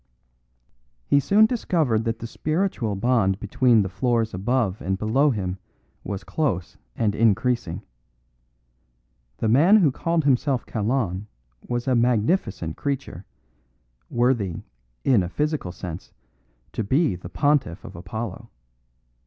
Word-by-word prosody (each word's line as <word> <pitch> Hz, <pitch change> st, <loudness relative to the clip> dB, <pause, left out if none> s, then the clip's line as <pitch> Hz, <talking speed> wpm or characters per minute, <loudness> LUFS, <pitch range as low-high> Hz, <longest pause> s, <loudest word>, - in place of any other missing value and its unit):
He 140 Hz, -, +4 dB
soon 205 Hz, +10 st, +5 dB
discovered 160 Hz, -, 0 dB
that 115 Hz, 0 st, -1 dB
the 115 Hz, -, -7 dB
spiritual 155 Hz, -, -1 dB
bond 100 Hz, -3 st, +1 dB
between 115 Hz, +1 st, +3 dB
the -, -, -2 dB
floors 115 Hz, +3 st, 0 dB
above 105 Hz, +1 st, 0 dB
and 95 Hz, +1 st, -1 dB
below 120 Hz, +9 st, +2 dB
him 95 Hz, -6 st, -2 dB, 0.4 s
was 100 Hz, 0 st, -5 dB
close 130 Hz, -, -2 dB, 0.2 s
and 105 Hz, -3 st, +1 dB
increasing. 115 Hz, -3 st, +1 dB, 1.5 s
The -, -, -1 dB
man 155 Hz, -, +6 dB
who 165 Hz, -9 st, +4 dB
called 165 Hz, +4 st, 0 dB
himself 135 Hz, -2 st, +1 dB
Kalon 105 Hz, -3 st, -1 dB, 0.4 s
was 120 Hz, +1 st, -2 dB
a 130 Hz, -, +3 dB
magnificent 115 Hz, -, +1 dB
creature, 135 Hz, -, -4 dB, 0.8 s
worthy, 120 Hz, -8 st, 0 dB, 0.4 s
in 125 Hz, -7 st, +4 dB
a 90 Hz, -, -3 dB
physical 150 Hz, -, -2 dB
sense, 90 Hz, -1 st, -8 dB, 0.6 s
to 110 Hz, -, -2 dB
be 130 Hz, -, +2 dB
the 90 Hz, -, -9 dB
pontiff 145 Hz, -, 0 dB
of -, -, -10 dB
Apollo. 100 Hz, +5 st, -6 dB
115 Hz, 120 wpm, -24 LUFS, 100-140 Hz, 1.5 s, man